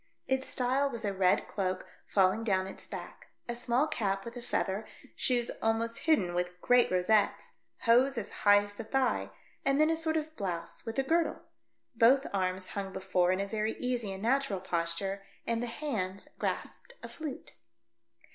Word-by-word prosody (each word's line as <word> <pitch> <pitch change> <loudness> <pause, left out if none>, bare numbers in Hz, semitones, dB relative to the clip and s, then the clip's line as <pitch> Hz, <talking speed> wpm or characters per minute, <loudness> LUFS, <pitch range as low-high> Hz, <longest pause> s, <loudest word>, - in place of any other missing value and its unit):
Its 265 0 0
style 265 +3 +1
was 235 -4 -5
a 200 - 0
red 190 -1 +3
cloak 185 -2 -2 0.2
falling 195 +3 +3
down 190 -4 +1
its 190 - -9
back, - - -8 0.2
a 240 - -2
small 245 +3 +1
cap 195 -9 -1
with 235 +1 -7
a 245 - -6
feather, 200 -3 -1 0.3
shoes 245 -2 +1
almost 225 +1 0
hidden 185 - +3
with 180 0 -2
great 245 +5 +4
rosettes, 190 +3 +2 0.3
hose 250 +3 +4
as 225 - -4
high 205 0 +6
as 205 0 -8
the - - -6
thigh, 265 +3 0 0.3
and 275 +1 +2
then 310 +1 +5
a - - +2
sort 320 0 +1
of 315 0 -4
blouse 185 - -4
with 225 - -4
a 270 - +3
girdle. 325 +3 +1 0.5
Both 260 +4 +5
arms 185 -1 -1
hung 195 -1 -4
before 185 -2 +1
in 185 - +1
a 200 - 0
very 215 +2 -1
easy 245 -5 -2
and 190 +1 -6
natural 250 -4 +1
posture 180 +2 -2 0.2
and 230 0 0
the 245 - -2
hands 215 -8 -3
grasped - - -4
a - - -5
flute. 305 -4 -7
225 Hz, 175 wpm, -31 LUFS, 190-255 Hz, 0.5 s, high